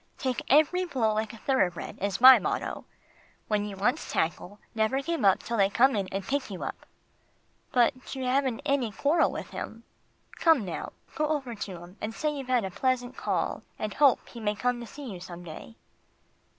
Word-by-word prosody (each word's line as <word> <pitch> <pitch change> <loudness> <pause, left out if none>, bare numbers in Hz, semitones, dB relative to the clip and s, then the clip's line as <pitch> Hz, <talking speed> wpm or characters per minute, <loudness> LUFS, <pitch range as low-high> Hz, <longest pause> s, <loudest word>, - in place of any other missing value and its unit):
"Take 255 -2 -2
every 310 +6 +4
blow 250 -11 0
like 215 0 -1
a 230 - -11
thoroughbred 190 -9 -1
is 200 0 -1
my 260 +1 +10
motto, - - -3
but - - -33
when 210 -1 +1
you 200 -2 -7
once 245 +10 0
tackle, 175 +5 -2 0.2
never 220 +4 +1
give 330 +1 -2
up 195 -2 +4
till 235 - -2
they 195 -1 +4
come 260 +5 +4
in 195 -2 -1
and 195 0 -4
pick 280 +1 -1
you 190 -3 -6
up." - - -6 0.8
"But 255 +2 +1
you 265 - -4
haven't 265 +1 0
had 280 - +2
any 250 -6 0
quarrel 290 - +2
with - - -6
him. 225 +1 -7 0.5
Come 320 - +4
now, 180 - -5 0.2
go 305 - 0
over 280 -6 -2
to 200 -4 -6
him 175 +4 -13
and 220 +1 -4
say 305 -1 0
you've 275 -3 -6
had 250 -5 +2
a 190 - -4
pleasant 255 +3 -1
call, - - -1 0.2
and 215 -1 -3
hope 280 -3 +4
he 235 - -10
may 210 -1 -1
come 245 +2 0
to 235 - -8
see 285 +5 -9
you 190 -6 -7
some 175 0 -9
day." 175 +7 -10
235 Hz, 205 wpm, -28 LUFS, 205-270 Hz, 0.8 s, my